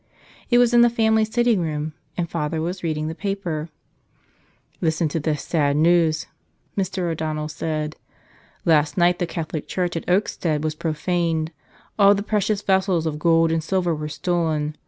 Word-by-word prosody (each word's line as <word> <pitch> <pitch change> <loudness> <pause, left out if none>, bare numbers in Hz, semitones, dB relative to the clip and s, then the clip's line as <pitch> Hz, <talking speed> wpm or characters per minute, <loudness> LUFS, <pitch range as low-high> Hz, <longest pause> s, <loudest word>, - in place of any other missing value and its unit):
It 240 - +4
was 245 -1 +4
in 240 - +7
the 240 - +6
family 220 -1 +2
sitting 235 -2 +2
room, 155 -1 -3 0.2
and 175 -2 -1
father 160 -1 -2
was 175 +4 -3
reading 155 -2 -2
the 160 - -3
paper. 175 -5 -3 1.1
"Listen 160 0 +1
to 160 - -2
this 150 -1 -2
sad 145 -3 +1
news," 160 -1 +3 0.5
Mr. 190 -3 -1
O'Donnell 155 -1 -3
said. 155 0 -3 0.3
" - - -31
'Last 150 -1 +3
night 175 0 +3
the 175 - 0
Catholic 160 -2 -4
church 180 -2 -2
at 165 - -4
Oakstead 170 -5 0
was 155 -1 -1
profaned. 160 0 -1 0.5
All 200 0 +7
the 200 - -2
precious 210 -1 0
vessels 190 -3 +2
of 150 -1 -2
gold 165 0 +3
and 165 -1 0
silver 175 0 0
were 150 0 -4
stolen. 155 -2 -1
165 Hz, 165 wpm, -22 LUFS, 155-185 Hz, 1.1 s, in